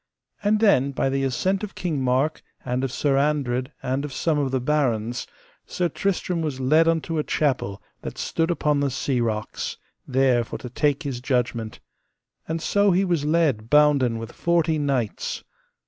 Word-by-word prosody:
And 210 +1 +3
then 140 - +4
by 135 - 0
the 135 0 0
assent 185 +10 0
of 210 - -6
King 155 -7 -2
Mark, 130 +5 +1 0.2
and 125 +1 -1
of 135 - -1
Sir 140 +1 +1
Andred, 140 -3 0
and 130 +2 -1
of 150 - -5
some 155 +2 0
of 140 -2 0
the 130 0 0
barons, 120 -5 0 0.4
Sir 175 -1 -1
Tristram 180 0 -1
was 150 -5 -3
led 155 +5 +4
unto 165 -1 0
a - - +1
chapel 125 - -1 0.2
that - - -7
stood 165 +1 -1
upon 150 -4 +1
the 140 -1 +1
sea 130 -1 -1
rocks, 110 -2 -3 0.3
there 130 -2 +3
for - - -6
to 125 - -9
take 145 +3 +1
his 135 -4 -4
judgment: 120 -4 -1 0.7
and 160 0 -3
so 205 0 +3
he 190 +1 +3
was 170 -5 0
led 150 -9 +1
bounden 145 -5 +4
with 115 +1 -6
forty 165 -2 +1
knights. 135 -7 -2
140 Hz, 175 wpm, -24 LUFS, 125-160 Hz, 0.7 s, then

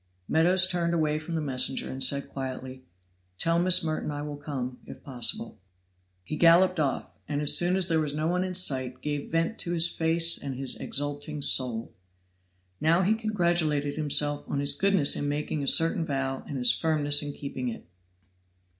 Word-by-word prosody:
Meadows 180 +4 +4
turned 170 -2 -1
away 155 -2 0
from 165 +2 -6
the 160 - -2
messenger, 130 -3 0
and 130 0 -1
said 140 +1 +3
quietly, 130 -1 -7 0.5
"Tell 165 - +1
Miss 180 0 +4
Merton 155 -1 -3
I 145 0 -5
will 150 -1 -6
come, 135 -4 -6
if - - -12
possible." 140 - -2 0.6
He 155 - -6
then - - -8
galloped 175 +1 +5
off, 140 -4 -2 0.2
and 145 -1 -3
as 150 -1 +4
soon 175 +1 +3
as 190 -2 +1
there 165 -3 +1
was 150 -2 -2
no 155 +2 -3
one 180 +2 0
in 185 -1 -5
sight 130 -7 0
gave 145 -1 -4
vent 165 +7 -1
to 175 - -2
his 165 0 +4
face 165 0 +1
and 135 -2 -6
his 135 0 -3
exulting 145 +1 -2
soul. 120 -5 +2 0.9
Now 165 +4 +2
he 200 +4 +2
congratulated 170 -9 0
himself 145 -1 +1
on 140 - -2
his 140 0 +2
goodness 195 -7 +3
in 145 - -2
making 150 +1 -3
a - - -4
certain 165 +2 +3
vow 135 -3 -3
and 140 - -5
his 125 -1 +4
firmness 145 -2 +1
in 145 -1 -4
keeping 130 -3 -6
it. 115 - -9
150 Hz, 185 wpm, -26 LUFS, 140-170 Hz, 0.9 s, galloped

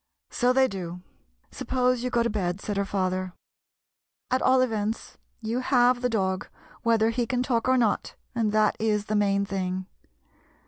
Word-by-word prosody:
" - - -63
So 245 +1 +5
they 265 +1 +4
do. 180 -5 -6 0.5
Suppose 250 -1 0
you 250 - -1
go 240 -1 +2
to 235 - 0
bed," 185 -3 -2
said 205 +1 -4
her 200 0 0
father. 185 -2 -2 1.0
"At 255 - +2
all 260 0 +4
events, 220 -3 -2 0.2
you 225 +2 -2
have 250 -1 +3
the 250 - +1
dog, 190 -4 -1 0.3
whether 225 -1 +3
he 235 0 -1
can 250 -2 0
talk 245 -2 0
or 260 - +4
not, 230 -4 0 0.2
and 225 -3 0
that 215 0 +3
is 210 -2 0
the 215 - -2
main 200 -1 +2
thing. 185 -1 -3
220 Hz, 175 wpm, -26 LUFS, 195-245 Hz, 1.0 s, So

